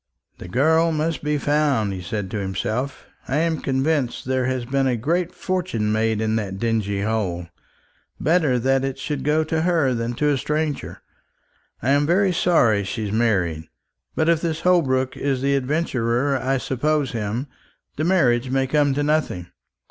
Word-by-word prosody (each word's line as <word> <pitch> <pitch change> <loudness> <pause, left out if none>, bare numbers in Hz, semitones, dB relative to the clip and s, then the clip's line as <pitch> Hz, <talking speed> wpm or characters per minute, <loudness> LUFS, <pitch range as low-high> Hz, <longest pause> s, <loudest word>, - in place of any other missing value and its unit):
"The - - -8
girl 160 - +3
must 155 0 -1
be 150 0 0
found," 145 -8 +1
he 95 - -5
said 95 +1 -4
to 105 - -2
himself. 110 +7 -3 0.2
"I 135 - 0
am 165 0 0
convinced 135 -1 0
there 130 0 0
has 130 -2 -2
been 135 +1 +1
a 125 -2 +1
great 170 +9 0
fortune 180 - -2
made 110 0 +1
in 110 0 +1
that 100 -3 -3
dingy 105 -3 -1
hole. 95 -6 -2 0.7
Better 155 -6 +2
that 135 +2 +1
it 135 -1 -2
should 145 -3 -4
go 150 +2 +2
to 160 0 -1
her 160 -6 +2
than 115 0 -2
to 150 +4 +1
a 140 - 0
stranger. 150 +1 -3 0.8
I'm 140 +3 +3
very 185 +2 +3
sorry 120 - +3
she's 105 +1 -4
married; 95 -8 0 0.5
but 160 - +1
if 165 -1 +3
this 165 -1 -2
Holbrook 130 -8 +2
is 135 -2 -1
the 140 0 +2
adventurer 135 -2 0
I 135 +1 0
suppose 140 +2 0
him, 115 +3 -3 0.5
the 155 - -2
marriage 130 -9 +2
may 135 0 +1
come 145 0 +2
to 145 - 0
nothing. 145 - -1
135 Hz, 165 wpm, -22 LUFS, 115-155 Hz, 0.8 s, girl